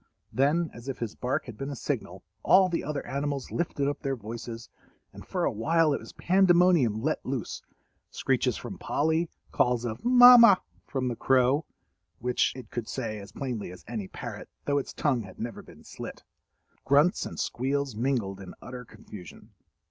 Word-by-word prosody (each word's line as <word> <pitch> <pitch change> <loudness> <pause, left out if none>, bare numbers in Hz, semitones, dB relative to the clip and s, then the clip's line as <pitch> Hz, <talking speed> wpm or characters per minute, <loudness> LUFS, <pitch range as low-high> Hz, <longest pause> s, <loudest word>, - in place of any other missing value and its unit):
Then, 155 +5 +2
as 120 +2 -11
if 135 - -3
his 115 -3 -4
bark 125 +1 -2
had 120 -4 -10
been 135 +1 -4
a 140 - -4
signal, - - -4 0.2
all 185 0 +5
the 170 - -1
other 145 -1 -4
animals 140 -1 -3
lifted 145 -5 -1
up 145 - -2
their 135 -1 -1
voices, 115 0 -7 0.5
and - - -10
for - - -2
a - - +1
while 155 +7 +2
it - - -1
was - - -11
pandemonium 175 - +3
let 155 +2 -1
loose—screeches 130 -6 -3
from - - -8
Polly, 160 +3 0 0.2
calls 125 -1 +1
of 115 -1 -5
"Mamma" 245 -4 +9 0.3
from 130 -2 -2
the 120 - -2
crow 130 +5 +3 0.5
(which 125 +4 +1
it 130 - -10
could 120 -2 -4
say 110 -5 -4
as 100 0 -11
plainly 125 -8 -4
as 90 - -13
any 110 -4 -4
parrot, - - -8 0.2
though 145 0 +2
its 135 - -6
tongue 135 -6 0
had 95 -3 -12
never 115 0 -5
been - - -16
slit), - - -9 0.6
grunts 145 +6 +3
and - - -8
squeals 135 0 -1
mingled 115 -5 -1
in 95 - -10
utter 125 0 -8
confusion. 105 -5 -13
135 Hz, 170 wpm, -28 LUFS, 115-150 Hz, 0.6 s, Mamma